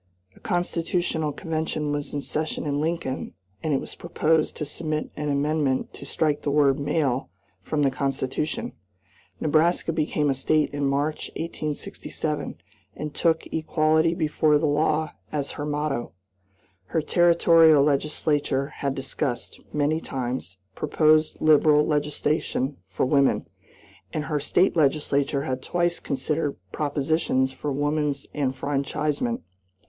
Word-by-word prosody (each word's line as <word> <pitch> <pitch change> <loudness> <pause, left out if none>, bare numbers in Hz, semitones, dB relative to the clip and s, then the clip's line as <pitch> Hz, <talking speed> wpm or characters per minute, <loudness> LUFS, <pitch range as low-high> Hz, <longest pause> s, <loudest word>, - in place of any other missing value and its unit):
A - - -18
constitutional 175 -3 -1
convention 155 -2 -2
was 145 0 -3
in 145 - -2
session 155 +3 -3
in 145 0 0
Lincoln, 160 -4 -2 0.3
and 155 - -1
it 135 - +2
was - - -7
proposed 160 -2 0
to 150 - -2
submit 155 +1 -3
an 150 0 -2
amendment 145 -1 0
to 140 - -10
strike 150 0 0
the - - -1
word 140 -1 +3
"male" 140 - 0 0.3
from 150 +10 -1
the 135 - +3
Constitution. 140 - -2 0.7
Nebraska 165 +2 +2
became 150 -2 +1
a - - +2
State 150 +3 +1
in 145 -1 0
March, 145 +3 -1
1867, 155 -2 -4 0.4
and 150 -1 -5
took 165 -1 +1
"Equality 160 +1 +2
before 155 -2 +3
the 150 - 0
law" 155 +1 +1 0.2
as 145 -2 -2
her 145 - -5
motto. 145 -4 -2 0.7
Her 155 - -1
Territorial 165 -3 +5
legislature 145 -1 +1
had 140 -1 -1
discussed, 135 -2 -3
many 150 +2 +1
times, 125 - -4 0.2
proposed 155 - +2
liberal 150 -1 +5
legislation 150 -2 0
for - - -1
women, 140 0 +3 0.7
and 155 - -2
her 150 -1 -1
State 180 +6 +2
legislature 140 -2 +2
had 130 -1 -2
twice 175 +3 0
considered 145 +2 -2
propositions 145 -2 +1
for 145 +2 -4
woman's 145 0 0
enfranchisement. 145 - -1
150 Hz, 125 wpm, -25 LUFS, 140-155 Hz, 0.7 s, Territorial